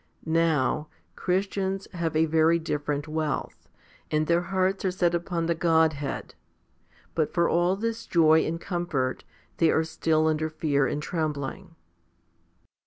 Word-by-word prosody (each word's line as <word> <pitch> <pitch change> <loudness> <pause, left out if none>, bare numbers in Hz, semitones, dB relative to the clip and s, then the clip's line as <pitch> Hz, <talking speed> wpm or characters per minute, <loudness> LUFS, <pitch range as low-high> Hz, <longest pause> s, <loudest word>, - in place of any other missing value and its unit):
Now, 160 -3 +1 0.3
Christians 195 +1 -1
have 165 -3 -2
a 160 +1 +4
very 160 +1 +3
different 150 -2 -3
wealth, 155 -2 -3 0.4
and 155 0 +1
their 170 +2 +2
hearts 190 +2 0
are 190 - +2
set 180 -2 +1
upon 170 -1 -1
the 170 - +1
Godhead; 160 -3 +1 0.8
but 155 -2 -1
for 170 -1 +3
all 175 +2 +2
this 230 +2 -3
joy 160 -2 +5
and 165 +1 -3
comfort, 170 -9 -2 0.3
they 165 - +4
are 160 - +3
still 160 -1 +1
under 155 0 +1
fear 145 -3 +1
and 150 - -3
trembling. 155 +2 -4
160 Hz, 135 wpm, -26 LUFS, 155-175 Hz, 0.8 s, joy